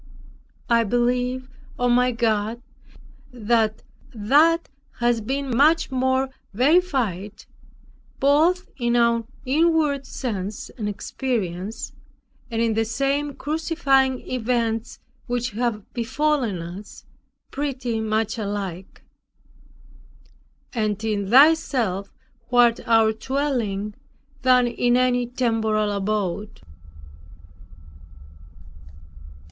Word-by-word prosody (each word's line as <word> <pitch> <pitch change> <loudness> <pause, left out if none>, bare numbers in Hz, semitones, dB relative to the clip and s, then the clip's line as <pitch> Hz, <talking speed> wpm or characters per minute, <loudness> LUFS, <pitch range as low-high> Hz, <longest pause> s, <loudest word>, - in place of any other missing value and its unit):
I 235 -1 +4
believe, 245 +3 0 0.3
O 245 - +1
my 250 +1 +3
God, 225 -1 0 0.7
that 225 -2 0 0.3
that 300 +10 +3 0.3
has 240 -1 +1
been 270 +2 -2
much 310 +4 +3
more 260 +1 +1 0.3
verified, 250 - +1 0.7
both 320 +7 +3
in 240 -2 0
our 235 -1 +3 0.2
inward 300 -1 +2
sense 205 -6 -5
and 210 -4 -4
experience, 205 -3 -4 0.6
and 230 -1 0
in 230 -1 +1
the 225 +1 +1
same 275 +5 -1
crucifying 280 -4 +1
events 235 -2 -1 0.3
which 245 0 -2
have 220 -1 -2
befallen 250 - 0
us, 180 +5 -10 0.5
pretty 255 -5 -2
much 220 +1 -1
alike; 200 -3 -5 1.7
and 215 -3 -1
in 205 -3 -1
Thyself, 245 - +4 0.4
who 245 - -3
art 240 -1 +5
our 225 -1 +5
dwelling, 225 -5 -2 0.5
than 255 -1 +5
in 240 +1 +1
any 245 -1 +2
temporal 220 -4 0
abode. 205 - -2
240 Hz, 90 wpm, -23 LUFS, 215-265 Hz, 1.7 s, art